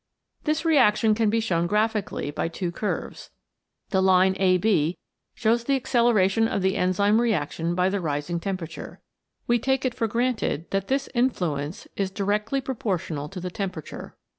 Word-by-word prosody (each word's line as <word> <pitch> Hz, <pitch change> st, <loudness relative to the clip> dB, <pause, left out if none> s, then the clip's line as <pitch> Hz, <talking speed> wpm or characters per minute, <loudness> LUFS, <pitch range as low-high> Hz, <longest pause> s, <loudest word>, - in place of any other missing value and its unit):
This 310 Hz, +1 st, 0 dB
relation 225 Hz, -8 st, +4 dB
can 220 Hz, 0 st, +2 dB
be 225 Hz, +2 st, +2 dB
shown 175 Hz, -6 st, 0 dB
graphically 210 Hz, -6 st, -1 dB
by 150 Hz, -, -2 dB
two 170 Hz, +1 st, -4 dB
curves. 205 Hz, +4 st, -4 dB, 0.6 s
The 190 Hz, -2 st, +2 dB
line 190 Hz, 0 st, +4 dB
AB 185 Hz, -3 st, +2 dB, 0.4 s
shows 230 Hz, +1 st, +1 dB
the 275 Hz, -, +2 dB
acceleration 230 Hz, -5 st, +2 dB
of 200 Hz, -, -2 dB
the 190 Hz, +1 st, +2 dB
enzyme 200 Hz, +5 st, +2 dB
reaction 170 Hz, -6 st, -1 dB
by 180 Hz, +1 st, +2 dB
the 195 Hz, 0 st, -1 dB
rising 155 Hz, +2 st, -2 dB
temperature. 180 Hz, -3 st, -6 dB, 0.5 s
We 240 Hz, 0 st, +2 dB
take 265 Hz, +2 st, 0 dB
it 255 Hz, -, 0 dB
for 230 Hz, -2 st, -1 dB
granted 230 Hz, -, -1 dB
that 195 Hz, 0 st, -1 dB
this 275 Hz, +1 st, 0 dB
influence 175 Hz, -, -1 dB
is 195 Hz, -1 st, -1 dB
directly 210 Hz, +6 st, -1 dB
proportional 185 Hz, -, -3 dB
to 185 Hz, -, -7 dB
the 180 Hz, 0 st, -5 dB
temperature. 185 Hz, -6 st, -6 dB
200 Hz, 155 wpm, -25 LUFS, 180-230 Hz, 0.6 s, relation